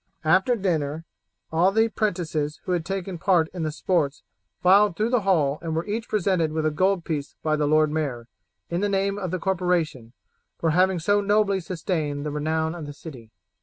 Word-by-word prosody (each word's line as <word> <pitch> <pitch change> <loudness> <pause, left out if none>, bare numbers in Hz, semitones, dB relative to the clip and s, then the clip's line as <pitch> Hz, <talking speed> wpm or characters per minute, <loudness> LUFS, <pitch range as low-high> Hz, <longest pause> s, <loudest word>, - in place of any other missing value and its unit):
After 190 +9 +4
dinner 165 -6 -1 0.5
all 170 +4 +3
the 220 +2 +3
'prentices 165 -9 -2
who - - -4
had 175 -2 0
taken 190 0 -4
part 170 -3 +3
in 180 - -5
the 155 -1 -1
sports 155 -3 -1 0.4
filed 195 +1 +5
through 220 +3 0
the 250 - +3
hall 155 -7 +2
and 165 -2 -3
were 165 - -1
each 220 +2 -4
presented 185 -6 +1
with 155 0 -1
a 155 - +2
gold 185 +2 +1
piece 150 -3 -4
by 155 -1 +2
the 150 -1 0
lord 155 0 +3
mayor, 135 -7 -3 0.4
in 170 +2 -2
the 205 - +1
name 200 +1 0
of 185 -3 -3
the 185 - -2
corporation, 175 -10 -1 0.4
for 165 - +1
having 185 +3 +3
so 205 +5 +2
nobly 205 -1 +2
sustained 160 -5 -3
the 150 - -2
renown 160 +2 -1
of 165 -4 -7
the 145 - -7
city. 130 -7 -11
170 Hz, 195 wpm, -24 LUFS, 155-195 Hz, 0.5 s, filed